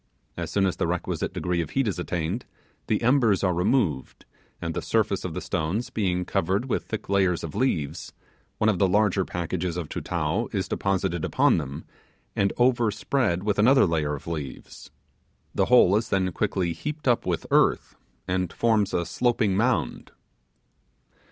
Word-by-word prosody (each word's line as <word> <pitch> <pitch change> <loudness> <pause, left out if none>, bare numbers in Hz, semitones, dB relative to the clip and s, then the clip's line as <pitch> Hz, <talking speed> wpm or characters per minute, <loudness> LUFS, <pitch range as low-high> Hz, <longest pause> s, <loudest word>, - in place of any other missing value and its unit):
As - - -4
soon 100 -1 +1
as 95 - -1
the - - 0
requisite - - -2
degree 90 -1 -1
of 80 - -5
heat 135 -3 0
is 95 -3 -2
attained, 90 +5 -2 0.4
the - - 0
embers 120 -6 +3
are 90 -2 +2
removed, 90 - 0 0.3
and - - -3
the - - -3
surface - - 0
of - - -5
the - - -3
stones 90 +10 -2
being 90 -4 0
covered 95 +5 0
with 125 - -1
thick 110 - -5
layers 95 -3 +1
of 80 - -5
leaves, 80 - -1 0.5
one 110 - +1
of 105 -5 +2
the 95 - +4
large 100 0 +2
packages 90 0 -3
of 85 -4 -4
Tutao 85 +6 -2
is 95 -3 -2
deposited 95 -4 -1
upon - - +3
them 70 +1 -6 0.5
and 100 -1 +2
overspread 120 -4 +1
with 105 -1 0
another 130 +5 +6
layer 75 -4 0
of 70 - -11
leaves. 75 -6 -7 0.6
The - - +2
whole 115 -6 +5
is 110 +2 0
then 95 -2 +1
quickly 90 -2 -1
heaped 150 - -5
up 120 -2 +2
with - - -1
earth, - - +2 0.3
and 90 -2 -1
forms 110 -4 +1
a 85 - 0
sloping 110 +2 +1
mound. 100 - 0
95 Hz, 165 wpm, -25 LUFS, 85-110 Hz, 0.6 s, another